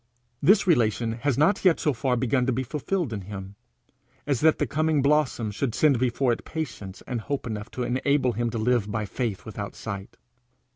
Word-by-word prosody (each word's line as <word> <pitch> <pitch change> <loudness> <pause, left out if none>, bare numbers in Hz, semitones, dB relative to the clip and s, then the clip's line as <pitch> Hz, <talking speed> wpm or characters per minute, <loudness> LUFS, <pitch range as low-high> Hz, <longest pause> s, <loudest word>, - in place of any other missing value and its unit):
This 200 +3 +5
relation 115 - +2
has 125 +3 -1
not 175 +8 +3
yet 180 -4 +4
so 150 - +1
far 125 +1 0
begun 125 +1 +1
to - - +3
be 130 +2 -1
fulfilled 150 +2 -2
in 100 - -4
him, 95 0 -8 0.7
as 140 -4 0
that 160 0 +4
the 145 - +1
coming 155 +2 +1
blossom 140 -7 +2
should 115 +2 -2
send 145 -6 +4
before 125 +1 +1
it - - -6
patience 105 - -6
and 120 -3 -3
hope 140 +4 -3
enough 110 -1 -5
to 125 - -4
enable 130 +1 +1
him 120 0 -1
to 115 - -4
live 110 -2 +1
by 105 0 -2
faith 110 -2 -3
without 105 -2 -6
sight. 100 -3 -7
125 Hz, 195 wpm, -26 LUFS, 110-145 Hz, 0.7 s, This